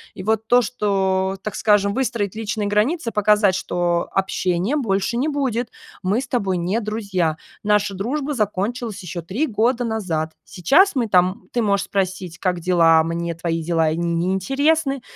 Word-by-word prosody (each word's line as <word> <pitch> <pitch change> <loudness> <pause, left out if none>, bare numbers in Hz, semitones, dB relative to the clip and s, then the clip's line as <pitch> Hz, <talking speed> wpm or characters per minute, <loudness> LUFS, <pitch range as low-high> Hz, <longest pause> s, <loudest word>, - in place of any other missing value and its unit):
И 185 - -7
вот 220 +1 0
то, 245 +1 +5
что, 195 -4 0
так 215 - -4
скажем, 205 -2 +2
выстроить 235 -6 -1
личные 215 -1 -2
границы, 230 +6 0
показать, 210 -1 +3
что: 175 -2 -1
"Общения 190 +4 0
больше 225 -4 0
не 265 +5 0
будет. 260 -6 -1 0.3
Мы 200 +4 +1
с 270 - -7
тобой 195 -7 0
не 180 +6 0
друзья. 200 -7 -1 0.3
Наша 210 -1 +2
дружба 275 +9 -2
закончилась 215 0 -2
ещё 175 0 -5
3 205 - -2
года 240 +1 +1
назад. 185 -9 -2
Сейчас 295 - +3
мы 240 -3 +1
там 185 0 +2
ты 240 - 0
можешь 200 -2 +1
спросить 185 -3 -2
'Как 180 -2 0
дела?'. 165 -2 +4
Мне 170 +1 -3
твои 165 0 -2
дела 165 -1 +1
и 160 - -2
не 170 +2 0
интересны, 275 - +1
200 Hz, 160 wpm, -21 LUFS, 180-235 Hz, 0.3 s, то